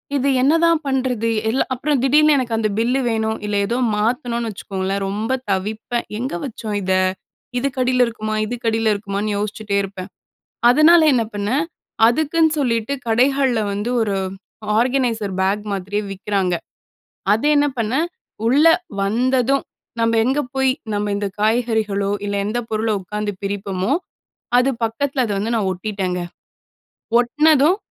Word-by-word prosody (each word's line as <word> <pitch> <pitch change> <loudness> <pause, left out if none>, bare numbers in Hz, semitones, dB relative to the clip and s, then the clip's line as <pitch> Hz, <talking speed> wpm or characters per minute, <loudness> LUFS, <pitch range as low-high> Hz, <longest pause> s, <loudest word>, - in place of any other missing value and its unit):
"இது 275 0 +1
என்னதான் 330 +3 +3
பண்ணுறது?" 255 -4 0 0.2
எல்லா 260 - +1
அப்புறம் 275 +2 0
திடீர்னு 300 +2 +5
எனக்கு 240 -3 -1
அந்த 220 -1 +1
பில்லு 250 +4 +1
வேணும், 220 -1 -1
இல்ல 205 0 -2
ஏதோ 240 +2 -1 0.2
மாத்தணும்னு 235 +1 -1
வச்சுக்கோங்களேன் 195 0 -3
ரொம்ப 215 +5 -2 0.2
தவிப்பேன். 215 +5 -2
எங்க 255 -3 -3
வச்சோம் 220 -4 -5
இத? 190 0 0 0.7
இதுக்கடியில 255 -1 +1
இருக்குமா, 215 -1 -3
இதுக்கடியில 225 -2 0
இருக்குமான்னு 205 0 -3
யோசிச்சிட்டே 210 0 -3
இருப்பேன். 195 -1 -7 0.6
அதனால 315 +5 +6
என்ன 240 -3 +2
பண்ணேன், 210 +8 0 0.4
அதுக்குன்னு 315 +5 +2
சொல்லிவிட்டு 230 0 0
கடைகள்ல 255 +1 +2
வந்து 205 +4 -2
ஒரு 205 -3 0 0.6
ஆர்கனைசர் 235 -5 0
பேக் 200 +2 0
மாதிரியே 200 +2 -2
விக்கிறாங்க. 195 -2 -1 0.8
அதை 225 +7 +1
என்ன 290 0 +3
பண்ணேன், 255 +9 0 0.4
உள்ள 285 +7 +4 0.4
வந்ததும் 255 +5 +1 0.3
நம்ம 230 0 +2
எங்கே 270 +4 +1
போய் 265 -1 +3 0.2
நம்ம 205 0 -1
இந்த 205 -1 -2
காய்கறிகளோ, 215 -3 +1 0.2
இல்ல 200 0 -2
எந்த 240 +3 -1
பொருளோ 220 0 0
உட்காந்து 210 +2 -3
பிரிப்பமோ, 195 +3 -1 0.7
அது 265 +2 +3
பக்கத்தில 260 +4 -1
அத 210 - -2
வந்து 225 +4 -1
நான் 200 -4 0
ஒட்டிட்டேங்க. 185 -1 -3 1.0
ஒட்டினதும், 300 +6 +4
225 Hz, 130 wpm, -20 LUFS, 205-260 Hz, 1.0 s, அதனால